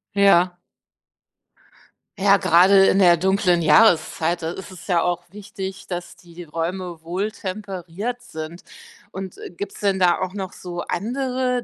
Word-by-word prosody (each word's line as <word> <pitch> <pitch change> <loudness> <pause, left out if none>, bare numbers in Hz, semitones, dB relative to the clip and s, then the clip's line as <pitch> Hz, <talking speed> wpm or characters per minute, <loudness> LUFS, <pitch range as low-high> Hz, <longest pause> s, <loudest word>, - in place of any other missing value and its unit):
Ja. 185 -3 +4 1.6
Ja, 200 +1 +5
gerade 195 +1 +5
in 195 - +3
der 175 -2 +6
dunklen 180 0 +2
Jahreszeit, 165 0 +3
da 160 0 -3
ist 190 +2 -9
es 185 - -12
ja 175 -3 +2
auch 175 0 -1
wichtig, 195 -1 -8
dass 175 -1 -6
die 175 0 -12
Räume 170 +1 -4
wohltemperiert 195 +3 -5
sind 165 -7 -8 0.5
und 190 -1 -7 0.2
gibt's 200 +3 -7
denn 195 -2 +1
da 175 -1 +3
auch 185 0 -3
noch 195 -2 -5
so 175 -1 -7
andere 250 +4 -2
185 Hz, 135 wpm, -22 LUFS, 175-200 Hz, 1.6 s, der